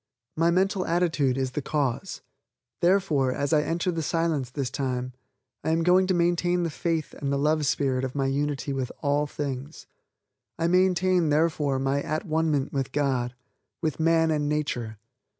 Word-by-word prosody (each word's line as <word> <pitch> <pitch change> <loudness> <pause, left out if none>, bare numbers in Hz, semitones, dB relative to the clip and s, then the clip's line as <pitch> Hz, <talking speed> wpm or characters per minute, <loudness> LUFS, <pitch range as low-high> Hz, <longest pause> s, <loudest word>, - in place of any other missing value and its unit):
My 165 +1 +3
mental 190 +2 +2
attitude 160 -7 +1
is 130 -1 -1
the 150 - -3
cause; 145 +3 -2 0.6
therefore, 170 -8 +3
as 140 +4 -1
I 150 - +5
enter 170 +4 -1
the 165 -1 -2
Silence 160 -5 0
this 130 -1 -3
time, 130 -2 -2 0.5
I - - -1
am 165 +1 +2
going 180 +2 +4
to 185 - +2
maintain 175 +1 +1
the 165 - -1
faith 165 0 -2
and 140 -2 -3
the 140 - +1
love 150 +1 +1
spirit 135 -2 0
of 130 0 -4
my 135 -1 0
unity 140 0 -1
with 130 -2 -3
all 145 +1 +1
things. 140 0 -5 0.7
I 165 - -1
maintain, 180 -1 +3
therefore, 150 -2 +1
my 135 +1 0
at 155 +6 -3
one 160 -1 +1
ment 140 -3 -1
with 135 -2 -2
God, 130 -4 0 0.4
with 155 -3 -2
man 165 0 +3
and 150 -1 0
nature. 125 -7 -2
150 Hz, 170 wpm, -26 LUFS, 135-165 Hz, 0.7 s, I